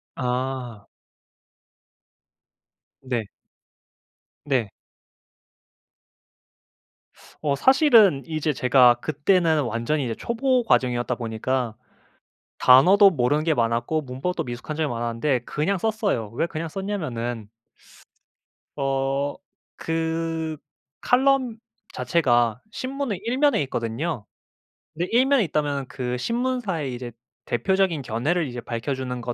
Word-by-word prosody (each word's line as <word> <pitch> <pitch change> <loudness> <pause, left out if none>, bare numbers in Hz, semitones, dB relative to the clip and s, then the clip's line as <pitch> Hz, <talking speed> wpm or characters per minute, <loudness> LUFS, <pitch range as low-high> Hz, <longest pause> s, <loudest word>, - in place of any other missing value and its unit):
아. 125 -3 -3 2.2
네. 120 -5 -3 1.2
네. 130 -7 0 2.7
어 145 -2 +1
사실은 230 - +5
이제 155 -1 -1
제가 125 -2 +5
그때는 155 +4 +1
완전히 120 +6 -1
이제 115 -2 -2
초보 250 - 0
과정이었다 125 - +1
보니까 115 +1 -2 0.9
단어도 185 +11 +7
모르는 145 0 +1
게 160 -2 +1
많았고 120 +6 0
문법도 135 +7 -3
미숙한 120 +5 -6
점이 155 -1 0
많았는데 120 +3 -1
그냥 170 +5 -1
썼어요. 210 - -1
왜 165 - +1
그냥 165 0 -5
썼냐면은 125 - -4 1.3
어 135 0 -1 0.5
그 160 -1 -2 0.4
칼럼 260 -2 +2 0.4
자체가 120 -8 +1
신문의 260 -6 -4
1 240 +3 -1
면에 285 -6 +3
있거든요. 120 +1 -3 0.7
근데 170 +3 -2
1 250 +3 +5
면에 275 -5 +3
있다면은 145 -4 -1
그 125 -1 -3
신문사의 230 - -2
이제 120 -1 -7 0.3
대표적인 175 +4 0
견해를 145 +9 -1
이제 120 -1 -6
밝혀 120 +4 -3
주는 125 -1 -4
145 Hz, 220 characters per minute, -24 LUFS, 125-180 Hz, 2.7 s, 단어도